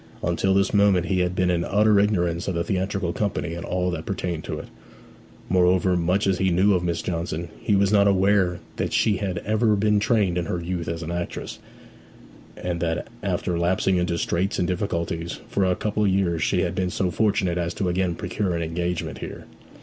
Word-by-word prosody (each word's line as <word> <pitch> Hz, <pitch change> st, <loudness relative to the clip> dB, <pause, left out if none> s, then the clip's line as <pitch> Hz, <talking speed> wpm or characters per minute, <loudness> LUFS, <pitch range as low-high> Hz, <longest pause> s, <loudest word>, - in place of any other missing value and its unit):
Until 90 Hz, +3 st, +1 dB
this 100 Hz, 0 st, +2 dB
moment 100 Hz, -3 st, +4 dB
he 95 Hz, +2 st, 0 dB
had 90 Hz, 0 st, 0 dB
been 90 Hz, -1 st, +2 dB
in 85 Hz, -1 st, 0 dB
utter 105 Hz, +2 st, +3 dB
ignorance 90 Hz, -4 st, +1 dB
of 95 Hz, -, -1 dB
the 85 Hz, -, 0 dB
theatrical 95 Hz, -2 st, -1 dB
company 100 Hz, -5 st, -2 dB
and 85 Hz, 0 st, -5 dB
all 90 Hz, 0 st, -1 dB
that 80 Hz, -2 st, -5 dB
pertained 90 Hz, -4 st, -3 dB
to -, -, -4 dB
it. -, -, -8 dB, 0.8 s
Moreover, 90 Hz, 0 st, +3 dB
much 90 Hz, +4 st, +1 dB
as 95 Hz, -2 st, +1 dB
he 95 Hz, -, +2 dB
knew 95 Hz, +4 st, +3 dB
of 90 Hz, -2 st, +1 dB
Miss 85 Hz, -2 st, -1 dB
Johnson, 85 Hz, -1 st, -3 dB
he 105 Hz, -, +1 dB
was 100 Hz, 0 st, +3 dB
not 100 Hz, -1 st, +5 dB
aware 95 Hz, -2 st, +2 dB, 0.2 s
that -, -, -2 dB
she 105 Hz, -3 st, +3 dB
had 95 Hz, -2 st, -3 dB
ever 110 Hz, 0 st, +2 dB
been 105 Hz, +1 st, +2 dB
trained 105 Hz, -5 st, +2 dB
in 85 Hz, -, -2 dB
her 90 Hz, -, -2 dB
youth 85 Hz, 0 st, -4 dB
as 85 Hz, 0 st, -3 dB
an 80 Hz, -, -5 dB
actress, 85 Hz, 0 st, -5 dB, 1.0 s
and 90 Hz, -1 st, -3 dB
that 85 Hz, +4 st, -2 dB
after 90 Hz, -2 st, -1 dB
lapsing 95 Hz, +2 st, +2 dB
into 90 Hz, -1 st, 0 dB
straits 90 Hz, +4 st, -1 dB
and 90 Hz, -, 0 dB
difficulties 85 Hz, -3 st, -2 dB
for 100 Hz, -, 0 dB
a 90 Hz, -1 st, +2 dB
couple 105 Hz, +1 st, -1 dB
of -, -, +3 dB
years 90 Hz, -4 st, +1 dB
she -, -, +1 dB
had -, -, -1 dB
been 90 Hz, -1 st, -1 dB
so 90 Hz, 0 st, -1 dB
fortunate 95 Hz, -3 st, +1 dB
as 85 Hz, -1 st, -1 dB
to 95 Hz, -, -1 dB
again 90 Hz, -1 st, 0 dB
procure 95 Hz, -2 st, -2 dB
an 85 Hz, -, -1 dB
engagement 85 Hz, +1 st, -3 dB
here. -, -, -7 dB
90 Hz, 205 wpm, -24 LUFS, 85-100 Hz, 1.0 s, not